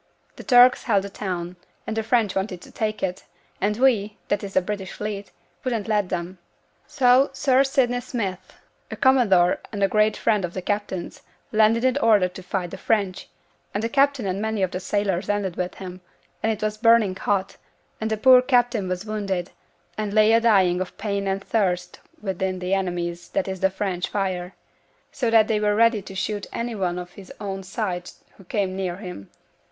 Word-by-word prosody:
'The - - -10
Turks 250 0 +6
held 205 -5 +2
the 200 - -7
town, 180 -3 -4 0.3
and 220 - -3
the 225 - 0
French 220 -3 +1
wanted 190 -2 -2
to - - -14
take 215 -2 -3
it; 185 0 -3 0.4
and 210 +1 +1
we, 220 -5 +2
that 205 0 0
is 195 -1 -7
the 185 - +5
British 190 -1 -5
Fleet, 205 -1 -5 0.3
wouldn't 235 -5 -2
let 210 -4 +1
them. 175 +2 -4 0.5
So 260 -1 +4
Sir 270 -1 +3
Sidney 255 -3 +1
Smith, 205 -7 -5 0.3
a - - -5
commodore 210 -10 +4
and 200 -2 -2
a - - +5
great 215 +2 +2
friend 210 -4 +1
of 175 -1 -4
the 185 - -3
captain's, 205 -3 -3 0.3
landed 220 +2 +3
in 260 +2 +2
order 215 -7 +4
to 180 +1 -10
fight 180 -1 -3
the - - -8
French; 200 -4 -1 0.5
and 205 - -1
the 230 - 0
captain 275 -2 +2
and 190 +1 -2
many 220 -2 -1
of 185 - 0
the 185 - -3
sailors 195 -1 -1
landed 200 -4 -1
with 180 0 -3
him; 185 -1 -9 0.4
and 220 - +1
it 215 -1 -4
was 215 0 -2
burning 230 -4 +4
hot; 195 0 -1 0.4
and 220 - -1
the 220 - -1
poor 255 +3 +7
captain 245 -5 +2
was 185 +2 -3
wounded, 195 -4 -3 0.5
and 210 -1 -2
lay 215 +1 +5
a 230 - +5
dying 190 -6 +4
of 185 - -6
pain 200 -1 -2
and 195 0 -1
thirst 180 -5 -1 0.2
within 190 -2 -2
the 180 +1 -2
enemy's 175 -2 -2
that 290 - -1
is 190 -1 -4
the 190 - +3
French 190 -2 -3
fire; 185 -2 -2 0.6
so 240 - -1
that 225 -1 +5
they 220 -2 +1
were 210 0 +1
ready 230 -1 +4
to 195 - -10
shoot 205 +1 -3
any 235 0 -3
one 180 -4 -2
of 180 0 -7
his 190 -1 -13
own 195 -2 -4
side 185 -2 -4 0.3
who 195 - -15
came 190 0 -1
near 185 -2 -2
him. 180 - -9
205 Hz, 195 wpm, -24 LUFS, 185-220 Hz, 0.6 s, poor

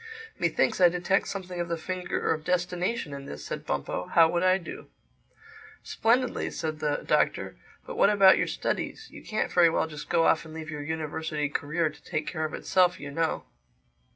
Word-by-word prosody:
"Methinks - - +1
I 175 - +8
detect 180 +3 0
something 185 -2 -5
of 175 - -1
the 170 - -1
finger 180 +1 -2
of 155 -1 -6
Destination 180 0 -1
in 140 0 -7
this," 75 - -8
said - - -6
Bumpo. 70 +6 -2
"How 165 -1 +6
would 170 +1 0
I 185 0 +4
do?" 175 - -9 1.0
"Splendidly," 245 +2 +1
said 155 -1 -4
the 150 -1 -1
Doctor. - - +1 0.3
"But - - -7
what 200 - +5
about 195 -2 +6
your - - +1
studies? 445 - -3
You - - -11
can't 215 - -2
very 175 -2 +6
well 160 - +1
just 150 -2 -9
go 165 -1 +3
off 160 - +3
and 160 -1 -11
leave 160 -1 -6
your 150 -1 -5
university 155 -1 -3
career 150 +3 -1
to - - -19
take 155 -3 -3
care 155 +1 -2
of 155 - -4
itself, 180 -1 +2
you 145 0 -7
know." 165 +2 -1
165 Hz, 190 wpm, -27 LUFS, 155-180 Hz, 1.0 s, I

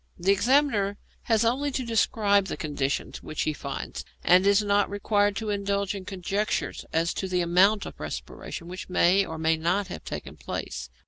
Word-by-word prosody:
The 180 +3 +2
examiner 215 -3 +2 0.3
has 225 -1 +3
only 265 +5 +1
to 260 -1 -2
describe 205 -3 +2
the - - -4
conditions 145 -3 -2
which 155 - -3
he 155 - 0
finds, - - -6 0.2
and 185 +2 +5
is 200 +1 +5
not 205 0 +2
required 205 0 +1
to 215 0 -2
indulge 200 -1 -1
in 195 -2 -7
conjectures 195 +2 -2
as 165 +2 +1
to 190 - -3
the 180 -1 0
amount 190 +5 +4
of - - -9
respiration 170 - -6
which 185 +1 -7
may 185 +2 +4
or 160 -3 -6
may 160 0 +2
not 185 +5 0
have - - -7
taken - - -7
place. - - -5
200 Hz, 180 wpm, -26 LUFS, 180-205 Hz, 0.3 s, and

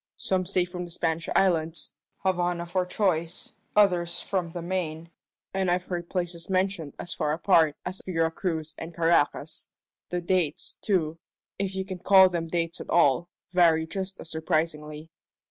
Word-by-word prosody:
Some 185 -1 0
say 185 -1 +2
from 180 0 -5
the - - -10
Spanish 165 -1 -1
islands 165 -3 +2 0.3
Havana 175 -2 +1
for 180 +1 -1
choice; 175 -4 -1 0.2
others 175 -4 +3
from 185 -4 -2
the 170 +1 -6
Main, 170 -2 -3 0.4
and 190 -1 +1
I've 180 +1 +1
heard 175 -2 -4
places 175 -2 -3
mentioned 185 -5 0
as 175 - -5
far 150 -2 0
apart 160 -3 +4
us 185 +1 -4
Vera 165 -3 +1
Cruz 160 -3 -3
and 165 0 -7
Caracas. 165 -2 +1 0.4
The 180 - -1
dates, 175 -3 0
too 165 -6 0 0.4
if 195 -1 -1
you 190 0 -2
can 185 -2 -6
call 190 0 +7
them 170 -2 -2
dates 165 +1 -2
at - - -9
all 170 +1 +4 0.2
vary 165 -3 +4
just 190 +3 -4
as 165 - -8
surprisingly." 155 -1 -2
175 Hz, 160 wpm, -27 LUFS, 160-185 Hz, 0.4 s, call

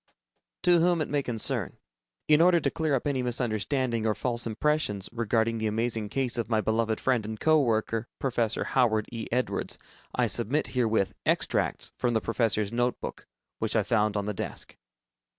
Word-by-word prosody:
_ - - -62
To 175 -1 +5
Whom 175 0 +3
It 155 - -2
May 145 -1 +1
Concern: 120 -5 -2 0.5
In 150 +1 +5
order 175 0 +6
to 140 -3 0
clear 155 -3 0
up 130 - -2
any 140 -3 0
misunderstanding 120 0 0
or 105 - +1
false 120 +2 -1
impressions 110 -5 0
regarding 115 0 0
the 110 - 0
amazing 110 0 -1
case 125 0 -1
of 115 -1 -2
my 110 -2 +2
beloved 110 0 0
friend 125 -4 +1
and 110 0 -6
co 155 -1 +4
worker, 115 -1 0
Professor 120 -4 0
Howard 110 -5 +2
E. 115 -2 -5
Edwards, 125 +2 -1 0.4
I 125 - +3
submit 120 +6 0
herewith, 110 -6 +1
extracts - - 0
from 120 -2 +1
the - - +4
professor's 110 -2 0
notebook, 120 +1 -2 0.3
which - - -1
I - - +3
found 105 -2 +1
on 100 - -1
the 105 - -2
desk. - - -5
115 Hz, 175 wpm, -28 LUFS, 110-130 Hz, 0.5 s, order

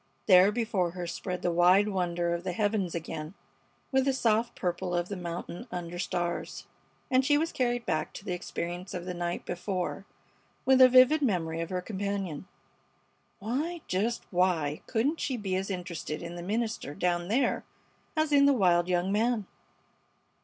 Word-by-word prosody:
There 190 0 +7
before 210 -6 0
her 175 - -3
spread 180 +1 -4
the 175 - +2
wide 180 +4 +5
wonder 175 -3 0
of 170 0 -3
the 185 -1 -2
heavens 205 -3 0
again, 160 +1 -5 0.6
with 265 -1 +3
the 275 - +2
soft 235 -2 +1
purple 180 0 -2
of 175 0 -1
the 200 - -3
mountain 175 +5 -6
under 175 0 -5
stars; 175 -1 -3 0.5
and 260 0 +4
she 290 +2 +4
was 325 +2 0
carried 245 -1 -1
back 155 - -1
to 200 - -9
the 180 - -2
experience 175 +1 -5
of 175 -1 -5
the 180 - -4
night 175 0 -3
before 180 +2 -3 0.6
with 260 0 +5
a 255 - +10
vivid 255 +5 +6
memory 165 - 0
of 165 - -4
her 185 -1 -2
companion. 195 -4 -3 0.9
Why, 295 - -3
just 215 +6 -1
why 175 -5 +1
couldn't 265 +8 0
she 260 -3 -1
be 195 -4 -2
as 190 +1 -2
interested 175 -4 -4
in 170 +1 -6
the 175 - -6
minister 215 - -2
down 175 -1 0
there 245 +5 +1 0.5
as 310 -1 +1
in 280 -1 +6
the 280 - +5
wild 175 -7 +3
young 180 +1 +1
man? 220 0 +1
185 Hz, 170 wpm, -29 LUFS, 175-235 Hz, 0.9 s, a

